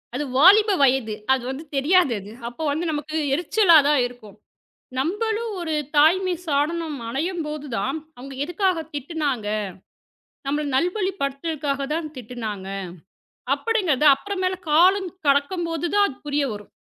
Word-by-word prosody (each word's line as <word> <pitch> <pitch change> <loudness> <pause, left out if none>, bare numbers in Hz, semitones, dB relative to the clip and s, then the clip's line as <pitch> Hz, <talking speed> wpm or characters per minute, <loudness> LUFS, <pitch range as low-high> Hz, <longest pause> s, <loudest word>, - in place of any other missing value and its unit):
அது 290 - -1
வாலிப 405 +8 +7
வயது. 255 -5 +2 0.2
அது 260 -2 -1
வந்து 270 +4 -5
தெரியாது 290 -1 +3 0.3
அப்போ 240 +7 -6
வந்து 315 +4 -2
நமக்கு 305 +1 -3 0.2
எரிச்சலாதான் 315 -4 +4
இருக்கும். 230 -5 -14 0.6
நம்மளும் 435 - -1
ஒரு 330 -2 -3 0.2
தாய்மை 360 +5 +4
ஸ்தானம் 305 +1 -1
அடையும்போதுதான், 295 - -3 0.2
அவங்க 270 +2 -9
எதுக்காகத் 345 -2 -1
திட்டுனாங்க. 285 -5 -2 1.0
நம்மள 295 +2 0
நல்வழிப்படுத்துவதற்காகத்தான் 310 -4 -1
திட்டுனாங்க 220 -5 -6 0.9
அப்படிங்கிறத, 370 - 0
அப்புறம் 400 +6 -5
மேல 370 0 +1 0.2
காலம் 370 +5 +4 0.2
கடக்கும்போதுதான் 335 +6 +1
அது 265 - -9
புரிய 290 0 0
வரும். 210 0 -9
300 Hz, 105 wpm, -23 LUFS, 275-355 Hz, 1.0 s, வாலிப